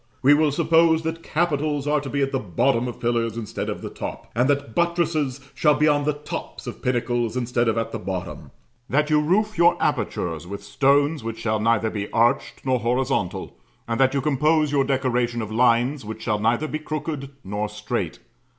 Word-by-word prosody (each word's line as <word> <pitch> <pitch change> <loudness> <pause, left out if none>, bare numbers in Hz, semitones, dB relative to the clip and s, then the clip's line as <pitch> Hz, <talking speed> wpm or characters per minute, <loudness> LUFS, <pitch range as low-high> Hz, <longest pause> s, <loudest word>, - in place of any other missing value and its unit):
We 140 +3 +7
will 150 0 +3
suppose 165 +1 +3
that 165 +1 -3
capitals 150 -4 0
are 150 0 +1
to 140 - -6
be 140 0 0
at 135 - -1
the 135 - 0
bottom 115 +5 +1
of 120 - -6
pillars 115 -1 0
instead 110 -3 -4
of - - -5
the - - -4
top; - - -7
and 125 +4 +2
that 140 -5 0
buttresses 165 -5 0
shall 150 -2 +3
be 150 - +3
on 145 -1 +2
the 150 - +2
tops 150 +1 -7
of - - -7
pinnacles 120 -1 0
instead 120 -1 0
of 115 - +1
at 115 - -1
the - - -4
bottom; 95 -2 -5 0.4
that 150 +2 +1
you 150 0 +4
roof 210 +7 +1
your 170 0 +5
apertures 85 0 -1
with 100 +1 -7
stones 140 +6 +2
which 115 0 -4
shall 110 -1 -1
neither 110 0 +2
be 105 -1 -4
arched 115 +3 +1
nor 130 -1 +2
horizontal; 120 -4 -1 0.3
and 115 +1 -2
that 135 +1 +3
you 140 - +1
compose 150 +2 +2
your 140 -2 +3
decoration 125 -3 0
of 110 -2 -4
lines 120 +4 +2
which 110 +1 -7
shall 105 -1 0
neither 115 +8 +1
be 155 - -3
crooked 150 -2 -4
nor 105 +2 -3
straight. 105 0 -3
130 Hz, 195 wpm, -23 LUFS, 115-150 Hz, 0.4 s, We